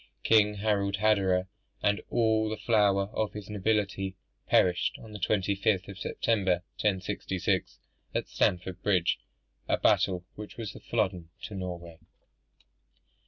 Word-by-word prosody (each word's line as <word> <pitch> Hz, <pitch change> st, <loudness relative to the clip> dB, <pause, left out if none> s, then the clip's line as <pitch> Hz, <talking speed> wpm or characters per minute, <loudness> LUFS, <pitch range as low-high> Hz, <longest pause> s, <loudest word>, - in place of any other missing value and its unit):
King 105 Hz, -2 st, +4 dB
Harald 100 Hz, -1 st, +1 dB
Hardrada, 95 Hz, -3 st, +2 dB, 0.4 s
and 105 Hz, 0 st, +2 dB
all 110 Hz, -2 st, +2 dB
the 110 Hz, -, -3 dB
flower 100 Hz, -3 st, +2 dB
of 110 Hz, -1 st, -1 dB
his 105 Hz, -1 st, -8 dB
nobility, 100 Hz, -2 st, 0 dB, 0.3 s
perished 90 Hz, -1 st, +3 dB
on 110 Hz, -, -12 dB
the 105 Hz, -, -6 dB
25th 100 Hz, 0 st, +1 dB
of 100 Hz, -1 st, -9 dB
September, 95 Hz, -6 st, 0 dB, 0.2 s
1066, 95 Hz, -1 st, -1 dB, 0.4 s
at -, -, -1 dB
Stamford 90 Hz, 0 st, 0 dB
Bridge; 90 Hz, -4 st, +2 dB, 0.5 s
a -, -, +2 dB
battle 90 Hz, -2 st, +2 dB
which 105 Hz, 0 st, -9 dB
was 110 Hz, -3 st, -5 dB
a -, -, -10 dB
Flodden 95 Hz, -7 st, -1 dB
to -, -, -6 dB
Norway. 85 Hz, -3 st, -6 dB
100 Hz, 125 wpm, -29 LUFS, 95-105 Hz, 0.5 s, King